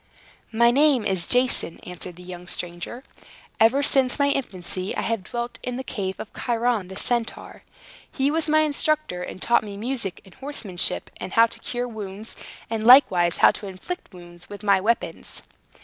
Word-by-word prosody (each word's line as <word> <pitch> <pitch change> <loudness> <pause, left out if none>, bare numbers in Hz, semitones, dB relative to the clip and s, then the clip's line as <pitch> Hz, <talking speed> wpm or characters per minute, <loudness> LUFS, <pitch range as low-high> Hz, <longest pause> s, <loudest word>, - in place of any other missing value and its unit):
"My 235 +1 +4
name 275 -3 +4
is 185 -3 0
Jason," 250 -9 +1
answered 180 0 -7
the 180 - -13
young 180 -1 -9
stranger. 175 +9 -5 0.6
"Ever 245 +6 +4
since 265 -3 +3
my 285 -1 +3
infancy, 185 -7 -3
I - - 0
have 225 -4 -1
dwelt 240 +2 -5
in 250 - -4
the 260 - -4
cave 195 -7 -4
of 220 - -8
Chiron 235 -4 0
the 190 - -9
Centaur. 235 +2 -2 0.5
He 275 +1 +1
was 320 0 0
my 310 0 +5
instructor, 305 - 0
and 180 - -7
taught 235 +4 +2
me 205 -2 -7
music, 230 -4 -3
and 190 - -16
horsemanship, 260 -10 -2
and - - -7
how 230 - +7
to 230 - -6
cure 245 0 -3
wounds, 215 -1 -8 0.3
and 225 -1 -3
likewise 190 -9 +6
how - - +7
to 205 - -8
inflict 195 - -7
wounds 175 -1 -11
with 205 +1 -9
my 200 -2 +4
weapons!" 230 +4 -2
225 Hz, 175 wpm, -24 LUFS, 185-255 Hz, 0.6 s, how